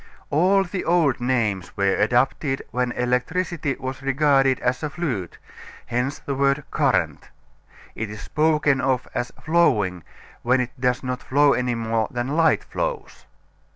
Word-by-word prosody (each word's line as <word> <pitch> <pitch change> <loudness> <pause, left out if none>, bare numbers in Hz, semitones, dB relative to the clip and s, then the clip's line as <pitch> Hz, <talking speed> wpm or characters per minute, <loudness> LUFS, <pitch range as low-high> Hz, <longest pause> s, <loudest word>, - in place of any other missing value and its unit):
All 185 +6 +4
the 185 0 -4
old 165 -7 +2
names 110 -7 -1
were 100 -1 +2
adopted 135 +5 +1
when 125 0 -1
electricity 135 +5 -1
was 130 +1 -5
regarded 135 -1 +3
as 125 0 0
a 150 - -2
fluid, 130 - -4 0.5
hence 125 +4 -2
the 140 - -5
word 140 +1 +1
"current." - - 0 0.6
It 110 -1 -4
is 105 0 -8
spoken 150 -3 +1
of 130 -1 0
as 120 0 -2
"flowing" 105 - +2 0.4
when 125 +2 +2
it 125 -1 -2
does 125 0 +1
not 125 -1 -3
flow 145 +3 +3
any 125 -1 0
more 115 -1 -1
than 120 +1 -3
light 160 +2 +2
flows. - - -5
130 Hz, 145 wpm, -23 LUFS, 120-150 Hz, 0.6 s, All